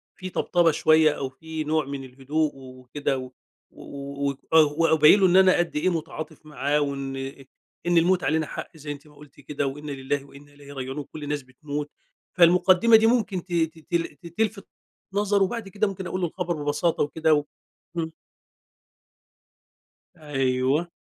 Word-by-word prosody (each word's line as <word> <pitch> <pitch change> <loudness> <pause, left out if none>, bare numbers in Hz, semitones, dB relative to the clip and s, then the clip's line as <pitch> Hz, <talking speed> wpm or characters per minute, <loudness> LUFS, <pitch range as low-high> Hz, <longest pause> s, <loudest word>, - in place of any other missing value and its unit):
فيه 185 0 -7
طبطبة 175 -2 +2
شوية 155 0 +4
أو 135 -1 -3
فيه 155 +3 -6
نوع 155 -1 +1
من 140 -1 -6
الهدوء 140 +4 -2
وكده، 130 +1 -4
و 130 0 -7 0.4
و 140 0 -6
ويك 140 -1 -2 0.2
و 155 0 +5
وابيّن 160 +4 +6
له 190 - +5
إن 180 - +3
أنا 190 -1 +6
قد 175 -2 -1
إيه 150 +5 +2
متعاطف 155 -2 -5
معاه 150 0 0
وإن 135 -1 -3 0.7
إن 175 -1 +3
الموت 180 +2 +3
علينا 155 0 +1
حق 160 - -8
زي 145 0 -6
أنتِ 145 +1 -9
ما 150 - -19
قُلتِ 145 -1 -17
كده، 140 0 -3
وإن 145 +2 -6
لله 140 +1 -3
وإن 140 +1 -15
إليه 145 0 -14
راجعون 135 +1 -5
وكلّ 150 +1 -7
الناس 145 0 -2
بتموت، 145 +3 -6 0.5
فالمقدِّمة 180 +6 +6
دي 220 0 +6
ممكن 210 -7 +1
ت 180 - -8
تتل 165 0 -1
ت 170 +5 -12
تلفت 205 +3 -2 0.5
نظرُه 205 -1 +2
وبَعد 215 0 -3
كده 205 +2 0
ممكن 190 -2 -5
أقُول 185 - -3
له 175 - +1
الخبر 175 -3 -3
ببساطة 150 +3 +1
وكده 160 +1 +1
و 145 -1 +2 0.5
إمم. 160 -1 -2 2.1
أيوه. 135 +1 0
155 Hz, 165 wpm, -25 LUFS, 140-175 Hz, 2.1 s, وابيّن